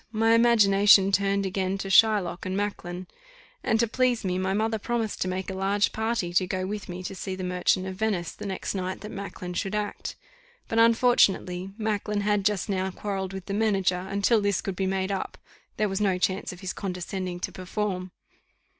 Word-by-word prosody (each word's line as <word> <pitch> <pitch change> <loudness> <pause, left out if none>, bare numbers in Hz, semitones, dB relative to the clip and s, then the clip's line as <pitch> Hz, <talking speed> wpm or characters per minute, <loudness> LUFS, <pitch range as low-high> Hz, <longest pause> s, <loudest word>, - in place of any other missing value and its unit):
My 225 0 +3
imagination 205 -4 +6
turned 200 0 +2
again 190 0 -1
to 195 - -5
Shylock 200 -4 +4
and 185 +1 -2
Macklin; 185 -3 -3 0.6
and, 220 - +2
to 235 - +3
please 245 -1 +1
me, 180 0 0
my 190 0 0
mother 220 +2 0
promised 225 0 -2
to - - +1
make 185 +1 -3
a - - -4
large 195 +2 +1
party 220 -5 -1
to 185 +1 +3
go 185 0 -2
with 205 0 -5
me 180 +1 -6
to 190 - -5
see 190 0 -5
the 185 - -6
Merchant 180 +1 +1
of 190 0 -6
Venice 200 -5 -1
the 210 - -8
next 190 - -3
night 185 -1 -3
that 210 +1 -7
Macklin 195 -3 -6
should 195 +3 -2
act; 210 -1 -3 0.5
but, 225 - 0
unfortunately, 200 -6 +3
Macklin 210 -1 -1
had 205 0 +1
just 205 -3 +1
now 190 -2 -1
quarrelled 190 0 -4
with 190 -1 -7
the 200 - -4
manager, 195 -4 +1
and 200 +1 -2
till 225 +1 +4
this 200 -2 +1
could 195 - -4
be 190 0 -1
made 190 0 -1
up, 195 - -3 0.4
there 215 - +2
was 195 +1 -2
no 195 -3 +2
chance 185 +1 -1
of 180 0 -11
his 190 -1 -3
condescending 180 -1 -4
to - - -3
perform. 185 0 -3
195 Hz, 200 wpm, -26 LUFS, 185-210 Hz, 0.6 s, imagination